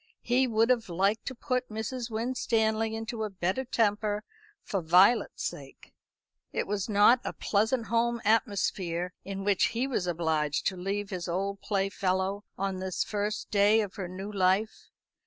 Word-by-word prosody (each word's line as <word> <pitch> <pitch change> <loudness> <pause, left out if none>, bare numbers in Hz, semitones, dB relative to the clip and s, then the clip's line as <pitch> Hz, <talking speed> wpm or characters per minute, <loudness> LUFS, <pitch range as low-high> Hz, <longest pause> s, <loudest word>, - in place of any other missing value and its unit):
He 255 +2 +2
would 225 +1 +3
have 235 -5 0
liked 195 +5 0
to 260 - -3
put 250 0 -2
Mrs. 230 +3 -4
Winstanley 225 -1 0
into 225 0 -4
a 215 - -2
better 190 +6 -1
temper, 210 -3 0 0.4
for 195 - -2
Violet's 180 +8 +4
sake. - - -7 0.6
It - - -1
was 205 +1 -2
not 210 +4 +6
a - - -4
pleasant 220 +3 0
home 235 +2 +1
atmosphere 185 -5 0
in 195 0 -5
which 200 -1 +3
he 250 - +1
was 235 -9 -1
obliged 160 -3 0
to 190 - +1
leave 195 +3 -3
his 180 -2 -4
old 195 +3 -2
playfellow 195 0 -1
on 195 0 -2
this 185 -1 -1
the - - -14
first 210 +1 -2
day 210 +2 +5
of 205 -3 -4
her 190 -3 -3
new 190 +3 -7
life. 195 +2 0
205 Hz, 160 wpm, -29 LUFS, 190-225 Hz, 0.6 s, not